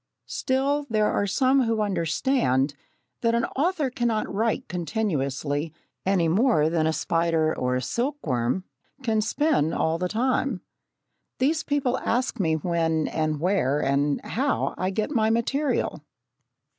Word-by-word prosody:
Still, 280 +2 0
there 215 -1 +2
are 200 - 0
some 260 +5 +3
who 225 -1 0
understand 170 - +1 0.5
that 230 -1 +2
an 235 - +2
author 300 -2 +1
cannot 235 -3 0
write 220 +3 0
continuously 155 - -2 0.4
any 185 -4 +3
more 170 - +3
than 160 -2 +2
a - - +2
spider 165 -1 +1
or 125 0 0
a 130 - -1
silkworm 175 - -1 0.4
can 220 -3 +1
spin 230 - +1
all 160 +1 0
the 180 0 -1
time. 245 -1 0 0.8
These 300 +5 +1
people 270 -3 0
ask 245 0 -1
me 160 -4 +2
when, 160 -1 0
and 155 -2 -1
where, 155 -5 +1
and 140 +1 +1
how, 275 +4 0
I 185 - -1
get 215 +7 -2
my 220 -5 +2
material. 270 +6 0
205 Hz, 135 wpm, -25 LUFS, 160-255 Hz, 0.8 s, some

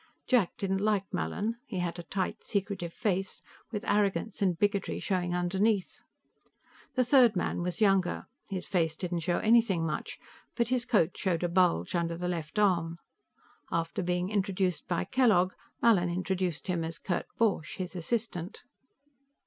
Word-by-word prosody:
Jack 235 -9 +2
didn't 195 -4 -1
like 210 -2 +2
Mallin. 205 - -2
He 190 - -5
had 175 -1 -2
a - - -3
tight, 185 +2 -3
secretive 195 -4 -2
face, 195 -2 -1 0.3
with 215 0 -4
arrogance 200 -1 0
and 185 -4 +2
bigotry 200 +1 0
showing 180 -2 -1
underneath. 190 +3 0 0.9
The 255 -1 +3
third 245 -4 +6
man 180 - -1
was 180 +4 -2
younger. 195 -3 +2 0.2
His 190 -3 -3
face 165 -4 +1
didn't 175 0 -2
show 175 +1 0
anything 220 -7 +3
much, 155 -1 -3 0.4
but 235 -1 +1
his 250 -2 +1
coat 185 -7 +2
showed 180 -4 -1
a - - +2
bulge 170 - +2
under 170 -1 0
the 180 +1 -3
left 170 +1 -4
arm. 170 -5 +2 0.7
After 165 +2 -1
being 180 +1 -1
introduced 190 -4 0
by 175 - 0
Kellogg, 210 -8 +3 0.3
Mallin 195 -7 +5
introduced 180 -1 -1
him 175 -3 -1
as 165 0 -4
Kurt 180 - -2
Borch, 205 -9 +1
his 185 -1 -5
assistant. 185 -1 -3
185 Hz, 155 wpm, -30 LUFS, 175-205 Hz, 0.9 s, third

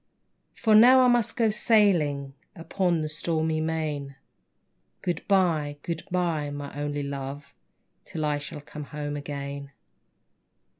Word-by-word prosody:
For 220 - +2
now 250 +4 +8
I 255 - +5
must 240 -3 +2
go 225 -3 +3
sailing 170 -11 +2 0.2
Upon 170 -1 0
the - - -2
stormy 160 0 -1
main; 155 -4 -3 0.9
Good 175 -3 -1
bye, 165 -7 +2
good 170 -1 -3
bye, 170 -5 0
my 145 0 -6
only 145 0 -3
Love, 140 0 -6 0.5
Till 155 -2 -4
I 145 -1 0
shall 145 +1 -7
come 145 0 -9 0.3
again. 140 -1 -6
155 Hz, 120 wpm, -26 LUFS, 145-180 Hz, 0.9 s, now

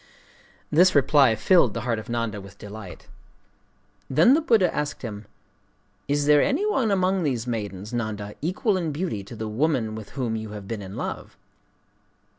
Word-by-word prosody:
This 180 +4 +5
reply 140 -4 +5
filled 165 - +3
the 115 - -2
heart 115 -2 -1
of 110 - -10
Nanda 115 -3 -2
with 100 0 -13
delight. 105 -3 -10 1.0
Then 160 - +5
the 315 - +3
Buddha 225 - +3
asked 145 -2 -3
him: 105 -3 -7 0.8
'Is 145 +1 +1
there 150 0 +6
any 330 +10 +1
one 270 - +1
among 190 -1 +1
these 130 -7 -1
maidens, 105 -3 -5
Nanda, 105 -3 -3
equal 185 - 0
in 165 -4 -2
beauty 150 - -3
to 100 - -10
the 110 0 -5
woman 120 -1 0
with 110 -2 -8
whom 120 -4 -1
you 110 -1 -6
have 105 -2 -8
been 110 -1 -4
in 95 0 -8
love? - - -6
120 Hz, 170 wpm, -25 LUFS, 110-165 Hz, 1.0 s, there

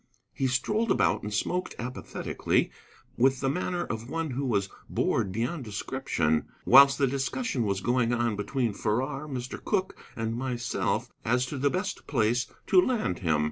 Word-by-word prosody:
He 135 - 0
strolled 210 - 0
about 195 - +2
and 105 - -5
smoked 180 - -1
apathetically, 125 +2 -1 0.5
with 130 +1 +3
the 135 -1 +1
manner 175 +2 -1
of 115 -2 -5
one 165 -1 -2
who 135 +3 -2
was 100 -5 +1 0.2
bored 95 - 0
beyond 120 - -2
description, 100 - -1 0.2
whilst 140 +2 +8
the 140 - +3
discussion 135 - -1
was 100 -1 -1
going 120 0 +2
on 120 -2 +1
between 115 +2 -1
Farrar, 130 +8 -1
Mr. 130 -3 -5
Cooke, 190 -3 0 0.2
and 115 0 -2
myself 120 -1 -1
as 125 +2 +2
to 135 +2 -5
the 140 +2 +3
best 185 +5 -3
place 120 -2 +1 0.2
to 185 - +6
land 215 - 0
him. 80 -5 +1
125 Hz, 160 wpm, -28 LUFS, 115-140 Hz, 0.5 s, whilst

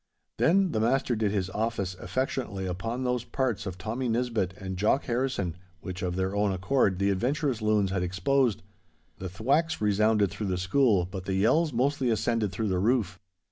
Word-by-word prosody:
Then 190 +2 +3
the 110 - 0
master 125 +2 +1
did 110 -1 +1
his 95 -2 -1
office 105 -3 -2
affectionately 100 +1 -3
upon 115 +8 -3
those 125 -1 0
parts 120 -5 -2
of 95 -1 -5
Tommy 115 +7 -3
Nisbett 115 -6 -1
and 95 -1 -5
Jock 105 +9 +2
Harrison 120 -8 -1 0.3
which 95 0 -6
of 90 -1 -2
their 95 +1 -1
own 100 0 +2
accord 95 +1 +1
the 100 +1 +2
adventurous 130 - 0
loons 105 -3 +2
had 95 -1 0
exposed. 100 +7 +1 0.6
The 95 - -5
thwacks 135 - 0
resounded 105 -1 +2
through 105 - -4
the 90 -1 -1
school, 95 0 +2
but 95 0 -7
the 95 - -1
yells 150 - +3
mostly 130 +1 +1
ascended 110 -2 0
through 110 +3 -2
the 90 -1 0
roof. 100 -4 +1
105 Hz, 180 wpm, -28 LUFS, 95-125 Hz, 0.6 s, Then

